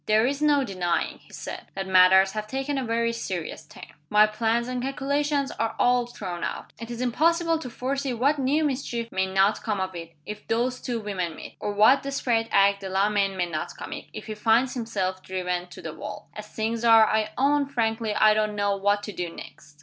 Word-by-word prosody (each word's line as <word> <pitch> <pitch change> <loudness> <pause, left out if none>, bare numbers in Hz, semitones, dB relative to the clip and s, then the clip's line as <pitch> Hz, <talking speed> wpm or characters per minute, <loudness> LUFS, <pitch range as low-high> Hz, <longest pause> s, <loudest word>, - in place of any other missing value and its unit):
"There 215 +1 +4
is 280 +3 -1
no 295 -2 +4
denying," 185 -6 -2
he - - -22
said, - - -7
"that 195 0 -3
matters 190 +1 +6
have 215 +1 -4
taken 270 +3 -2
a - - -2
very 230 0 0
serious 175 -8 -5
turn. - - -11 0.2
My 210 0 +6
plans 225 +2 0
and 250 -1 -3
calculations 280 +2 -1
are 225 0 -1
all 245 -1 +3
thrown 185 -7 -6
out. - - -5
It 230 - -7
is 240 0 -5
impossible 330 +6 +2
to 255 - -6
foresee 270 +3 -2
what 275 +5 +1
new 280 +4 +2
mischief 250 -5 -2
may 190 0 0
not 195 +2 +2
come 210 -3 -2
of 190 0 -2
it, 165 -1 -8
if 210 - -8
those 245 +3 0
two 240 -2 -3
women 185 -6 -3
meet; - - -10
or 205 - -3
what 220 +7 +5
desperate 245 -5 0
act 200 0 +4
Delamayn 195 0 +1
may 180 - +1
not 160 -3 -5
commit, - - -7
if - - -8
he 220 - -5
finds 225 +4 +2
himself 195 -6 -2
driven 180 -1 -3
to 175 - -12
the 160 - -5
wall. 210 +3 -8
As 210 0 -8
things 225 +2 -3
are, 225 -1 +7
I 215 0 +1
own 280 +1 +2
frankly 225 -4 -1
I 215 0 +5
don't 215 -1 0
know 205 -1 +1
what 205 +1 +1
to 210 - -5
do 180 -3 -4
next. 150 -2 -12
220 Hz, 210 wpm, -25 LUFS, 195-255 Hz, 0.2 s, are